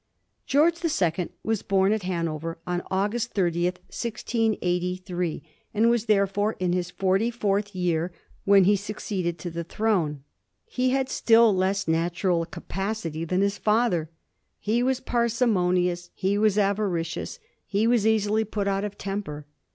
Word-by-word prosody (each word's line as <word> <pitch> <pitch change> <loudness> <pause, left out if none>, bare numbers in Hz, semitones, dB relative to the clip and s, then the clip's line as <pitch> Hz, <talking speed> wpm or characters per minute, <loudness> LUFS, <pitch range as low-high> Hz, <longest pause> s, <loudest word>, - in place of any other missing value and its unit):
George 320 +4 +3
the 335 - 0
Second 175 - 0
was 220 -2 0
bom 195 +1 +2
at 220 - -1
Hanover 165 -3 -3
on 180 0 -1
October 205 +5 0
30, 175 -7 0
1683, 180 -3 -2 0.3
and 230 +3 +4
was 235 -2 +1
therefore 205 0 +2
in 180 -1 -1
his 180 -1 -1
forty 195 +5 +1
fourth 205 -3 -1
year 175 -1 0 0.3
when 200 -1 +6
he 205 +3 +5
succeeded 195 -3 -3
to 175 - -6
the 170 +1 -4
throne. 170 -7 -1 0.4
He 255 - 0
had 265 0 +1
still 230 -4 +4
less 190 0 0
natural 170 +1 +1
capacity 185 -3 -4
than 185 +3 0
his 200 0 0
father. 210 -8 +1 0.5
He 225 +3 0
was 260 +1 +1
parsimonious; 180 -7 +1
he 195 +2 0
was 210 -1 +2
avaricious; 195 -5 -1 0.3
he 205 +2 +1
was 230 -2 +3
easily 220 0 +2
put 205 -1 -3
out 195 0 0
of 205 -1 -5
temper. 195 -7 -5
195 Hz, 145 wpm, -25 LUFS, 180-220 Hz, 0.5 s, when